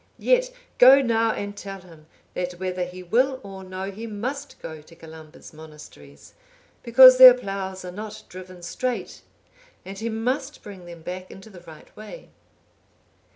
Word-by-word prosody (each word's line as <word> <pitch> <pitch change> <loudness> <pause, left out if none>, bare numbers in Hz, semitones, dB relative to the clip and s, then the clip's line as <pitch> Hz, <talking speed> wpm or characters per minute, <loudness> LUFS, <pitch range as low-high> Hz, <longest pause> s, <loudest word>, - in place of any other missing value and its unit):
Yet, - - +1 0.3
go 260 +2 +8
now 230 -2 +1
and 205 -1 -6
tell 195 -1 -9
him, 165 -4 -18 0.3
that 180 0 -4
whether 180 0 -4
he 180 +1 -11
will 255 +8 0
or 195 -1 -10
no, 190 +1 -7
he 220 +4 -9
must 255 +7 -6
go 160 -1 -9
to 165 +2 -19
Columba's 160 -1 -14
monasteries, 150 - -15 0.5
because 255 +2 +7
their 255 -1 +11
ploughs 195 -5 -6
are 180 - -7
not 210 +3 -9
driven 185 -1 -12
straight; 250 +7 -5 0.6
and 195 +1 -9
he 230 +1 -4
must 255 +6 -4
bring 195 -4 -12
them 170 -2 -12
back 185 +2 -7
into 195 +3 -14
the 180 -3 -14
right 155 -2 -15
way." 215 - -12
195 Hz, 155 wpm, -23 LUFS, 180-230 Hz, 0.6 s, their